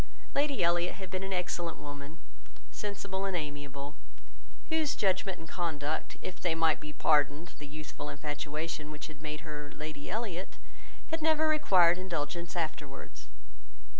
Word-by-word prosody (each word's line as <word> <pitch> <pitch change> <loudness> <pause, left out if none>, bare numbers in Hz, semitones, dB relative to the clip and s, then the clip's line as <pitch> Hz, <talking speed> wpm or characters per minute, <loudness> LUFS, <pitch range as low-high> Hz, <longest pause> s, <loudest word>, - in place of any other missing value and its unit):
Lady 280 -7 +3
Elliot 175 +1 +3
had 190 -1 -7
been 185 - -1
an 195 0 -3
excellent 175 -2 0
woman, 145 +2 -7 0.5
sensible 200 -2 -3
and 195 -2 +1
amiable; 145 -2 -4 0.8
whose 315 -2 +3
judgement 190 -1 +2
and 160 - -9
conduct, 155 -3 -1
if 185 - -5
they 170 -3 +2
might 165 -1 +4
be 150 - -6
pardoned 150 +2 +3
the 145 - -6
youthful 150 0 -6
infatuation 150 +1 -3
which 150 +1 -6
made 150 -1 -3
her 150 -2 -6
Lady 155 -1 -5
Elliot, 195 -4 -2 0.6
had 320 0 0
never 315 0 +5
required 185 - +6
indulgence 170 -1 -2
afterwards. 155 -4 -3
165 Hz, 135 wpm, -33 LUFS, 150-190 Hz, 0.8 s, required